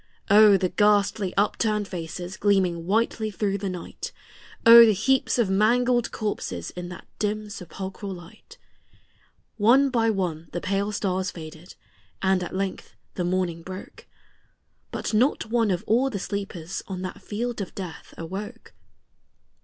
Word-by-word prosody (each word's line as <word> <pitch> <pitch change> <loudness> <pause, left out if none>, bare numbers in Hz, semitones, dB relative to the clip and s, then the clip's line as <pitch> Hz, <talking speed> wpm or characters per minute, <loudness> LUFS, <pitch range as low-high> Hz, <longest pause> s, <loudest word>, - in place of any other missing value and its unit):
O, 210 -1 +8
the 185 -1 0
ghastly 205 -1 +2
upturned 210 0 +1
faces 175 +1 -6
gleaming 185 -4 +1
whitely 220 +1 +1
through 200 0 -1
the 195 0 -3
night! 180 -2 -6 0.5
O, 235 +1 +11
the 220 -2 +5
heaps 260 +8 +1
of 235 -4 +3
mangled 240 +5 +2
corses 205 - -4
in 175 0 -7
that 180 - -10
dim 210 0 -2
sepulchral 195 +2 -7
light! 175 -2 -12 1.0
One 255 +6 +5
by 225 -2 +2
one 175 -6 -2
the 175 - -2
pale 200 +3 -1
stars 190 -2 -1
faded, 160 +1 -10 0.4
and 190 -1 +2
at 180 - -5
length 195 0 -4 0.2
the 180 - -2
morning 175 -2 -1
broke; 185 +3 -10 0.8
But - - -4
not 225 0 +1
one 230 -2 +2
of 180 -3 -1
all 250 +5 +2
the 220 - -4
sleepers 195 -4 -5
on 185 -1 -5
that 185 - -6
field 230 +1 -3
of 190 - -7
death 180 -4 -8
awoke. 190 +5 -7
200 Hz, 145 wpm, -25 LUFS, 180-215 Hz, 1.0 s, O